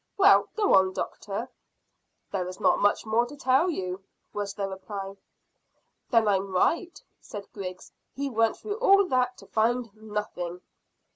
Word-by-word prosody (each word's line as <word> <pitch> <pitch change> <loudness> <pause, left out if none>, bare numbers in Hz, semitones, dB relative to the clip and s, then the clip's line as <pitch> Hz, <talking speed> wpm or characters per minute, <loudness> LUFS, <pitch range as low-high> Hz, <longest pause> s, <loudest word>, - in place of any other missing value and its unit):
Well, 400 0 +6
go 420 -2 +2
on, 190 0 +5
doctor." 210 +5 -4 0.8
"There 185 -3 -2
is 185 0 -8
not - - +3
much 205 +2 +2
more 225 +2 +2
to 290 - -10
tell 270 +6 +3
you," 185 - -4 0.3
was 205 -1 -3
the 200 -1 -2
reply. 195 0 -6 1.0
"Then 230 -3 +4
I'm 195 -1 +1
right," 335 - +1 0.2
said 205 -2 -9
Griggs; 185 -2 -7 0.2
"he 280 +1 -2
went 225 -3 +1
through 420 0 -5
all 395 -4 +6
that 250 -1 +1
to - - -14
find 230 0 0
nothing." 210 -5 -5
215 Hz, 150 wpm, -27 LUFS, 195-255 Hz, 1.0 s, Well